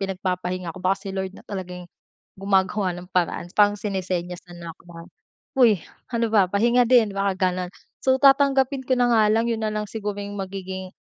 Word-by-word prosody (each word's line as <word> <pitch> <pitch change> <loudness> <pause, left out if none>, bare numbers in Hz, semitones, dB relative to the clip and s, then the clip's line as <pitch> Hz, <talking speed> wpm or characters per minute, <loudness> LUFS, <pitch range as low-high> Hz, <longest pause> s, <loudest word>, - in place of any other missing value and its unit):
pinagpapahinga 185 -2 -3
ko - - -7
baka 185 +2 +1
si - - -3
Lord 190 -1 -3
na - - -12
talaga 185 -3 -6
yung 180 -1 -10 0.5
gumagawa 190 0 +1
ng 180 0 -10
paraan, 175 -1 0
parang 205 0 +5
sinesenyasan 180 -3 -4
na 165 -1 -7
'ko - - -23
na, 165 0 -11 0.5
"Huy, 220 -7 +5 0.3
ano 230 -1 +1
ba, 205 -3 +5
pahinga 235 +5 +3
din." 240 -4 +5
Baka 195 -2 +1
gano'n, 180 0 -4 0.3
so 260 0 +4
tatanggapin 275 -1 +4
ko - - +2
na 245 0 +3
nga 220 -1 +5
lang 225 +2 +1
'yon 225 -1 -2
na 215 - -1
lang 210 0 -2
siguro 210 -2 -4
yung 205 0 -6
magiging, 190 -1 -6
195 Hz, 190 wpm, -23 LUFS, 185-220 Hz, 0.5 s, parang